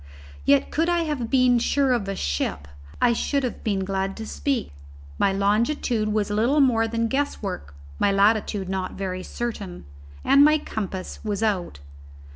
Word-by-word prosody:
Yet 140 - +3
could 325 +3 +1
I 345 -1 +2
have 290 -7 -3
been 255 -2 +4
sure 270 +2 +2
of 225 -5 -1
a 195 - -2
ship, 70 - -2 0.3
I 240 - +4
should 275 +4 0
have 250 - -4
been 195 -3 0
glad 195 0 -2
to 220 - -6
speak. 270 - -2 0.5
My 195 - +3
longitude 215 +3 +1
was 210 -1 0
little 235 +8 +2
more 235 -5 +3
than 230 0 -1
guesswork; 205 - -3 0.2
my 200 - +3
latitude 205 -1 +2
not 190 -1 -3
very 185 -1 -4
certain; 205 - -5 0.4
and 280 - +6
my 305 +1 +6
compass 195 -9 -5
was 210 0 -2
out. 180 - -1
220 Hz, 160 wpm, -24 LUFS, 195-250 Hz, 0.5 s, and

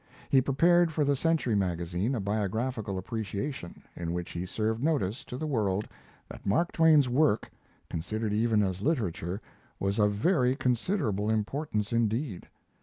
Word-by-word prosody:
He 135 - +6
prepared 170 +6 +4
for 150 -1 +1
the 140 0 +2
Century 160 -5 +1
Magazine 90 +4 0
a - - -1
biographical 105 +1 -2
appreciation, 105 +1 -5
in 85 0 -3
which 90 0 -4
he 85 +2 -4
served 110 +4 -1
notice 140 - 0
to 125 - -6
the 155 - -3
world 105 -8 0 0.4
that - - -11
Mark 125 - +1
Twain's 160 -4 +5
work, 125 -2 +2 0.4
considered 105 +6 -3
even 110 -1 +3
as 95 -1 -2
literature, 100 - -1 0.4
was 100 +2 -1
of 105 -1 +3
very 125 - +2
considerable 120 - 0
importance 110 0 -1
indeed. 115 - -1
110 Hz, 145 wpm, -29 LUFS, 100-140 Hz, 0.4 s, He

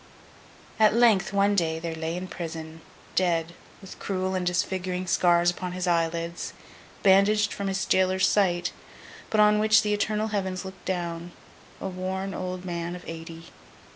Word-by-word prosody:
At 215 0 +5
length, 220 -6 +4
one 200 +1 +3
day, 165 -4 +1
there 165 0 -4
lay 160 +1 -3
in 185 +1 -5
prison, 160 -2 -7 0.3
dead, 170 -2 +1 0.3
with 195 - -11
cruel 190 -1 -2
and 185 -1 -1
disfiguring 180 0 -1
scars 175 0 +3
upon 180 0 -5
his 185 0 -3
eyelids, 170 0 -1 0.5
bandaged 200 +2 +4
from 200 - -3
his 195 0 -1
jailer's 185 0 +3
sight, 180 -3 +2 0.6
but 215 - +1
on 210 0 +5
which 215 0 +5
the 210 0 +1
eternal 215 +1 0
Heavens 190 -2 -2
looked 190 0 -10
down, 170 -1 -3 0.5
a - - -4
worn 190 +1 -3
old 185 0 -5
man 170 -1 -3
of 180 - -10
eighty. 165 0 -8
185 Hz, 155 wpm, -26 LUFS, 170-195 Hz, 0.6 s, At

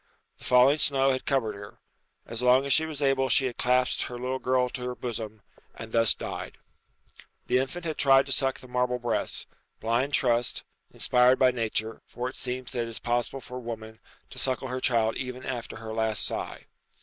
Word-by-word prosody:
The - - -12
falling 130 +4 +5
snow 135 -1 +4
had 130 - -3
covered 130 -6 +1
her. 100 0 -11 0.6
So 125 +2 -1
long 130 +2 +5
as 140 - +2
she 160 0 +3
was 150 -2 -3
able 135 -1 +2
she 135 - +3
had 125 -2 -3
clasped 125 0 +2
her 125 - -6
little 130 +2 -3
girl 130 -1 +1
to 125 +1 -6
her 125 0 -3
bosom, 110 -4 -6 0.3
and 110 0 -9
thus 115 -1 +4
died. - - -6 0.9
The 125 +1 +2
infant 150 +7 -4
had 160 -2 -3
tried 135 -1 +5
to 135 - -6
suck 135 0 +2
the 130 - -12
marble 125 0 0
breast. 120 -2 0 0.3
Blind 120 +5 0
trust, 120 -2 +1 0.3
inspired 125 +1 +3
by 130 -1 +5
nature, 110 -2 -2
for 125 +1 -4
it 130 - -11
seems 125 0 -4
that 120 - -2
it 115 - -3
is 115 - -5
possible 120 +2 -2
for 125 +1 -8
a - - -6
woman 110 -2 -7 0.3
to - - -7
suckle 130 0 -1
her 130 +1 -3
child 115 -3 +1
even 125 -1 -6
after 120 -3 -5
her 110 0 -7
last 110 -1 +1
sigh. - - -4
125 Hz, 200 wpm, -27 LUFS, 115-130 Hz, 0.9 s, falling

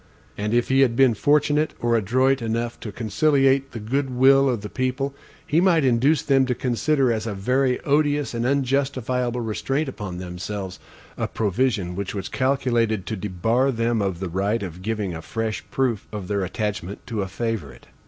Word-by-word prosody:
And 105 +1 -2
if 120 +1 +1
he 135 +1 +3
had 125 -4 +3
been 130 -1 +5
fortunate 150 +5 +2
or 120 0 +1
adroit 130 +5 +2
enough 115 +1 -2
to 110 - -6
conciliate 135 +5 +2
the 115 - -6
good 135 +6 -1
will 135 +2 +5
of 120 -5 -1
the 105 - -5
people, 130 +4 -2 0.3
he 160 +3 +2
might 170 -6 +4
induce 130 +5 +3
them 135 -2 +3
to 125 - 0
consider 130 +1 +1
as 110 0 -3
a 105 - -3
very 125 +5 +1
odious 145 -1 +1
and 115 0 -2
unjustifiable 130 -2 0
restraint 135 +7 -1
upon 105 -8 -6
themselves, 90 +1 -6 0.4
a - - -1
provision 105 -4 0
which 100 +1 -4
was 95 -2 -4
calculated 120 -6 +1
to 110 - -3
debar 110 +7 0
them 115 -2 0
of 95 -4 -2
the 95 -1 -3
right 100 +5 0
of 90 -1 -7
giving 105 -2 -2
a 80 - -6
fresh 110 +5 -3
proof 125 -6 -1
of 105 -4 -6
their 100 -1 0
attachment 100 -1 -4
to 110 -4 -3
a 95 - -2
favorite. 100 - -4
120 Hz, 180 wpm, -23 LUFS, 105-135 Hz, 0.4 s, been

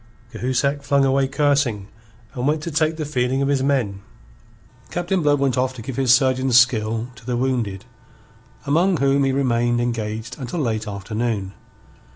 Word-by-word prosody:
Cahusac 140 +3 -1
flung 140 -1 +2
away 135 0 +2
cursing, 135 -7 +1 0.5
and 125 +1 -2
went 150 +1 0
to 170 - -4
take 155 +1 +1
the 155 - -3
feeling 130 -1 0
of - - 0
his 140 -2 +1
men. 125 -8 0 0.9
Captain 175 +1 -1
Blood 145 -1 +3
went 135 -2 +1
off 130 0 -1
to 115 - -8
give 130 +1 -6
his 130 -2 +3
surgeon's 130 -1 +4
skill 115 -2 +2
to 130 -1 -16
the 120 +1 -2
wounded, 120 -7 -2 0.8
among 175 +5 +2
whom 140 0 +2
he 135 - +1
remained 120 -3 +1
engaged 115 -1 -3
until 135 +6 -4
late 110 -5 -1
afternoon. 105 0 -3
130 Hz, 165 wpm, -21 LUFS, 115-140 Hz, 0.9 s, surgeon's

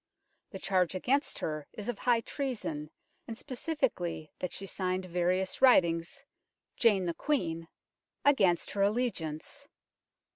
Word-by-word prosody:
The 195 - -7
charge 185 -2 +1
against 270 - +1
her 155 -2 -3
is 210 - -7
of 245 -4 -3
high 240 -2 +3
treason, 220 - -3 0.4
and 225 - -6
specifically 245 - -2
that 180 - -3
she 195 - -4
signed 185 -1 -2
various 180 +1 0
writings 175 0 +4 0.3
" - - -58
Jane 200 -5 +5
the 170 - 0
Queene, 165 - -1 0.2
' - - -60
' - - -61
against 195 -12 +4
her 200 - -1
allegiance. 210 - -1
190 Hz, 140 wpm, -31 LUFS, 170-245 Hz, 0.4 s, Jane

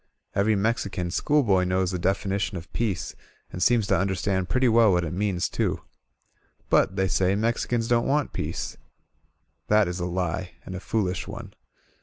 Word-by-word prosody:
Every 105 +2 +2
Mexican 100 -4 -1
schoolboy 110 - +2
knows 90 0 +1
the 90 - -3
definition 95 +1 -1
of 85 0 -10
peace 110 -7 -2 0.4
and 90 - -6
seems 115 +2 +4
to - - +2
understand 95 -1 -1
pretty 130 0 +2
well 115 -2 +5
what 90 -1 +2
it 80 - -4
means, 95 -2 0
too. - - -2 0.9
But, 95 - +3
they 95 -1 +1
say, 95 +1 +2
Mexicans 115 +1 0
don't 120 0 +2
want 145 +1 0
peace. - - -4 0.9
That 105 -2 +4
is 90 +1 -4
a 90 - -2
lie, 90 0 -2
and 95 - -7
a 90 - -4
foolish 95 -3 -2
one. 105 0 -8
100 Hz, 165 wpm, -25 LUFS, 90-110 Hz, 0.9 s, well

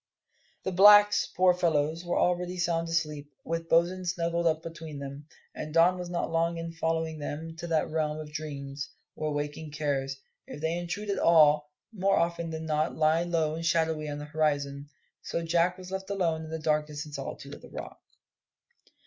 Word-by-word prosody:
The 190 - -1
blacks, 205 +2 +7
poor 185 0 +4
fellows, 165 -1 +1
were 175 - -1
already 180 0 +1
sound 170 -1 0
asleep, 150 -3 -2
with 165 0 -3
Bosin 175 +3 +3
snuggled 170 -1 0
up 160 0 +1
between 165 -2 -7
them; 140 +1 -8 0.3
and 155 +1 -6
Don 175 +2 +5
was 180 -1 -5
not 175 -1 -2
long 165 +1 +1
in 165 0 -4
following 160 -1 -2
them 150 +2 -5
into 165 +1 -7
that 160 -2 +1
realm 155 -1 0
of 150 -1 -8
dreams, 140 -2 -5 0.2
where 155 - -3
waking 150 +1 -3
cares, 140 -3 -2 0.3
if - - -8
they 160 +2 -1
intrude 180 +4 -3
at 195 - -1
all, 150 -3 +5 0.2
more 195 -1 +2
often 170 0 0
than 160 0 -5
not 155 0 0
lie 160 +1 +3
low 165 -3 0
and 165 +1 -4
shadowy 160 -2 +1
on 145 - -4
the 145 - -6
horizon. 145 -2 -1 0.3
So 170 - -3
Jack 170 +2 +2
was 185 0 -10
left 190 0 -4
alone 165 -5 0
in - - -9
the 160 - -3
darkness 150 -1 -1
and 150 - -12
solitude - - -6
of - - -10
the - - -13
Rock. - - -8
160 Hz, 185 wpm, -29 LUFS, 150-170 Hz, 0.3 s, blacks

